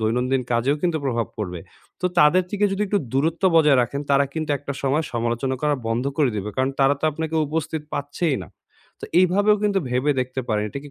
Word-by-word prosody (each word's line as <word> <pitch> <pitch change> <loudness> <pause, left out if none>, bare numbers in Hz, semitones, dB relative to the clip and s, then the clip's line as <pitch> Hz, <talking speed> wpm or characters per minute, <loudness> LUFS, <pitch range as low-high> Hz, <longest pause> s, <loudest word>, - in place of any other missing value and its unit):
দৈনন্দিন 125 +4 0
কাজেও 120 +5 +2
কিন্তু 175 -3 +1
প্রভাব 120 -4 0
পড়বে। 90 -5 -4 0.4
তো 180 - +1
তাদের 175 +3 +5
থেকে 205 0 +1
যদি 195 +2 -1
একটু 205 +1 +1
দূরত্ব 160 +7 0
বজায় 150 -4 +5
রাখেন, 140 +4 -3
তারা 140 0 +4
কিন্তু 160 -1 -3
একটা 140 0 -5
সময় 140 +4 +1
সমালোচনা 120 +3 -1
করা 150 -1 +2
বন্ধ 115 +2 -1
করে 145 -5 +3
দিবে। 105 +1 -3
কারণ 130 +1 +1
তারা 135 +1 +4
তো - - -2
আপনাকে 160 +1 -4
উপস্থিত 160 +1 -3
পাচ্ছেই 145 +1 -1
না। - - -16 0.5
তো - - -6 0.2
এইভাবেও 200 +3 +4
কিন্তু 205 -2 +2
ভেবে 125 +4 +1
দেখতে 130 +1 -3
পারেন। 105 -2 0
এটা 140 - -6
কি 145 - -11
140 Hz, 205 wpm, -23 LUFS, 125-160 Hz, 0.5 s, তাদের